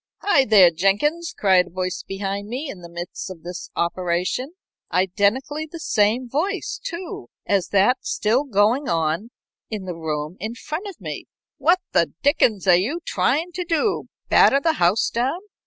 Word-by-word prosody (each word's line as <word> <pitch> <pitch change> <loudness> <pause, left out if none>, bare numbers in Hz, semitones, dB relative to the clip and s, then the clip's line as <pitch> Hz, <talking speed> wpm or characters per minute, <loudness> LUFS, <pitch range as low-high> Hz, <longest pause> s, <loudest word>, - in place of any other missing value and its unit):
"Hi, 285 -10 +4
there, 195 -6 +7
Jenkins!" 205 - +1
cried 185 -3 +4
a - - -12
voice 185 +1 -3
behind 195 +1 -4
me, 265 +6 -4
in 190 - -11
the 170 - -10
midst 175 +2 -6
of 180 -4 -10
this 175 0 -7
operation, 180 - -1 0.4
identically 220 - 0
the 335 - -6
same 225 -1 +1
voice, 365 - -2
too, 345 - -6 0.2
as 195 -3 +1
that 205 +6 +3
still 230 +6 +1
going 235 +4 +2
on 165 +6 0 0.4
in 210 -4 -5
the 180 - -4
room 155 +1 -4
in 220 +5 -4
front 310 - -5
of 390 - -9
me. - - -6 0.3
"What 365 +2 +3
the - - +2
dickens 240 - +3
are 185 - +6
you 235 - +1
trying 320 +7 0
to 360 +1 -3
do 340 +4 0 0.2
batter 275 - +5
the 325 +2 +2
house 180 +5 +3
down?" 255 +8 0
210 Hz, 165 wpm, -22 LUFS, 180-295 Hz, 0.4 s, there